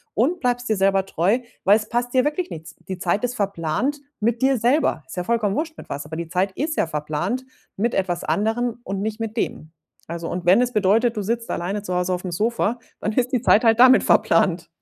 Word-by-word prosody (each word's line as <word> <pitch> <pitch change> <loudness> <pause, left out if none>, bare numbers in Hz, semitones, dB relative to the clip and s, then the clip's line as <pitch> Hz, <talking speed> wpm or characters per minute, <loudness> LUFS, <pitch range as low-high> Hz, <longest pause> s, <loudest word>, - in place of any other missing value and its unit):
und 300 - +1
bleibst 245 -1 -1
dir 215 - +1
selber 195 0 +2
treu, 195 +10 +1 0.3
weil 200 - +7
es 215 -1 -7
passt 240 +1 -1
dir 255 -1 +4
wirklich 335 +5 -1
nichts. 160 0 -9
Die 185 -1 -5
Zeit 190 +6 0
ist 245 0 -4
verplant 200 - -1 0.2
mit 235 +3 0
dir 265 -1 +4
selber. 245 - +2
Ist - - -10
ja 180 - -1
vollkommen 220 -2 0
wurst 315 0 -3
mit - - -12
was, 145 +1 -5
aber 160 +1 -7
die 170 -1 -4
Zeit 190 +2 0
ist 310 +6 -3
ja - - +2
verplant 155 - -2 0.3
mit 235 +4 0
etwas 180 -2 -1
anderem 225 +8 -1
und 195 -2 -4
nicht 215 +1 -3
mit 225 0 -4
denen. 155 -6 -3 0.3
Also, 165 0 -5
und 175 0 -4
wenn 185 +7 +6
es 245 0 0
bedeutet, 220 +3 +2
du 205 - -1
sitzt 230 +2 -2
alleine 195 +4 -2
zu 180 -3 -4
Hause 180 +1 0
aufm 180 0 -4
Sofa, 230 +4 0 0.2
dann 210 - -1
ist 250 +2 0
die 245 - +2
Zeit 225 -2 +4
halt 225 +1 +4
damit 255 0 +7
verplant. 185 -5 +3
210 Hz, 225 wpm, -22 LUFS, 180-245 Hz, 0.3 s, weil